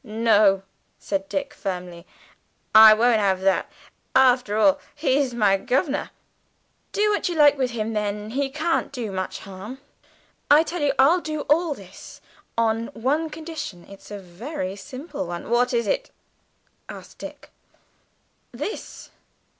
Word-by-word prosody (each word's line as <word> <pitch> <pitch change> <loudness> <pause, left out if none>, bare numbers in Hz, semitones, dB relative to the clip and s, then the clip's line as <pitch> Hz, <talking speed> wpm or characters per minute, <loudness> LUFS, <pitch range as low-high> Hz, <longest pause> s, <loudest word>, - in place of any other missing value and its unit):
"No," 215 -4 +3 0.3
said 195 -1 -3
Dick 285 0 -3
firmly; 180 -7 -6 0.7
"I 220 0 +10
won't 230 0 +3
have 190 -2 +1
that. 190 0 +1 0.5
After 250 -5 +4
all, 285 +6 +4 0.2
he's 280 -3 +1
my 210 -5 +3
governor." 275 - -1 0.8
"Do 420 +1 +2
what 410 - 0
you 345 - -3
like 295 -2 +6
with 260 -3 0
him 225 -2 -3
then, 210 0 -3
he 275 +2 -1
can't 310 +4 -1
do 240 -6 -5
much 185 0 -4
harm. 195 +6 -9 0.7
I 295 +2 +7
tell 330 +1 -5
you, 290 -1 +3
I'll 315 +7 +5
do 310 -2 -4
all 310 +1 +1
this, 190 -4 -13 0.4
on 225 0 +1
one 290 +8 0
condition 310 - -7
it's 200 -1 -14
a 205 - -6
very 195 - -6
simple 285 - -7
one 175 0 -6
" - - -7
"What 245 +1 +3
is 235 -2 0
it?" - - -1 0.8
asked - - -11
Dick. - - -10 1.0
"This. 295 - -7
245 Hz, 145 wpm, -23 LUFS, 205-290 Hz, 1.0 s, I